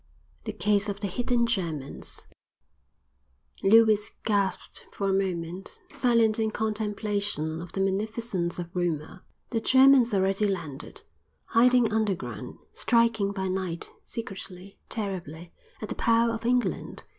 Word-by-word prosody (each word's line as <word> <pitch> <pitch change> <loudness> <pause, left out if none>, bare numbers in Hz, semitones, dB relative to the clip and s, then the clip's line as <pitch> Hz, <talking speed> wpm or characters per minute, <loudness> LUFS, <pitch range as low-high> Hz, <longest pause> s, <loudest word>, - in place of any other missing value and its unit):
The - - -2
Case 205 0 +1
of 200 0 -4
the 205 - -3
Hidden 240 +4 +1
Germans 165 - -2 1.3
Lewis 215 0 +5 0.2
gasped 200 -3 -1
for 200 - -2
a 195 - +2
moment, 185 -1 -3
silent 230 -3 +3
in 220 -1 +1
contemplation 205 -6 -2
of 175 - -9
the 195 - -1
magnificence 195 -2 0
of 175 0 -7
rumor. 175 0 -2 0.3
The 225 -2 0
Germans 260 -1 +6
already 195 +1 +2
landed, 160 -7 -5 0.4
hiding 240 -1 +4
underground, 205 -4 -2 0.2
striking 230 -4 +2
by 190 -1 -3
night, 185 -2 -3
secretly, 195 -4 -8
terribly, 175 -6 -5 0.3
at 215 - -5
the - - -2
power 230 0 +2
of 230 +1 -3
England! 250 0 -1
200 Hz, 120 wpm, -27 LUFS, 185-225 Hz, 1.3 s, Germans